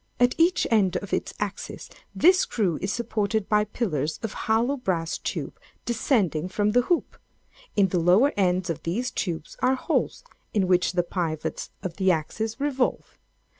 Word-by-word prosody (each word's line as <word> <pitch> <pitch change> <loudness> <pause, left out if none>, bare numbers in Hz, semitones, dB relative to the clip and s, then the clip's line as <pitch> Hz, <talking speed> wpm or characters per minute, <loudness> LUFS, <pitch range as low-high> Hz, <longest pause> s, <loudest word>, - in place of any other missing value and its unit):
At 245 0 +4
each 350 +2 +4
end 190 -5 +3
of 195 +1 -7
its - - -1
axis 205 -1 -5 0.3
this 365 +2 +6
screw 195 - 0
is 190 - -1
supported 220 -3 -1
by 210 0 +3
pillars 160 - -2
of 225 - -3 0.2
hollow 235 +5 +3
brass 175 -9 -2
tube - - -4 0.3
descending 210 - +1
from 205 +2 +1
the 245 +3 +4
hoop. 340 +7 -1 0.6
In 200 -3 +4
the 180 - +1
lower 185 - +4
ends 185 -2 +1
of 160 - -5
these 230 +10 -2
tubes 165 -4 -4
are 255 +1 +3
holes - - -1 0.3
in 200 -3 +3
which 180 0 +2
the 175 -1 +2
pivots 170 -3 -3
of 180 -4 -5
the 190 -1 +2
axis 210 - -1
revolve. 275 -3 -1
205 Hz, 165 wpm, -25 LUFS, 180-235 Hz, 0.6 s, this